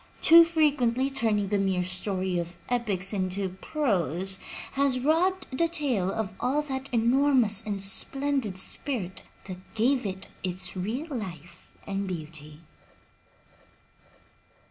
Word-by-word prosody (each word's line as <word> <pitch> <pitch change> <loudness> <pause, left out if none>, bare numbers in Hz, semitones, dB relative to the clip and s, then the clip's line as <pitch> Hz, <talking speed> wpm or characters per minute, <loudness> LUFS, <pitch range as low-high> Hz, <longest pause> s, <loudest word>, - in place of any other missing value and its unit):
Too 335 +1 +9
frequently 275 -6 +1
turning 215 -6 +1
the 205 -1 +1
mere 190 -2 0
story 185 0 -1
of 170 0 -5
the - - -2
epics 205 -5 0
into 190 0 -1
prose 190 - 0 0.3
has 275 -2 +2
robbed 330 +3 +1
the 335 +4 +2
tale 270 - 0
of 220 -3 -3
all 280 +4 0
that 270 -2 -5
enormous 240 -2 +3
and 200 -2 -3
splendid 270 0 +1
spirit 190 -1 -2 0.2
that 185 -2 -8 0.2
gave 245 +1 +1
it 190 0 -5
its 185 +1 -1
real 220 - -3
life 175 -7 -9
and 200 0 -3
beauty. 155 -3 -8
210 Hz, 120 wpm, -27 LUFS, 185-270 Hz, 0.3 s, Too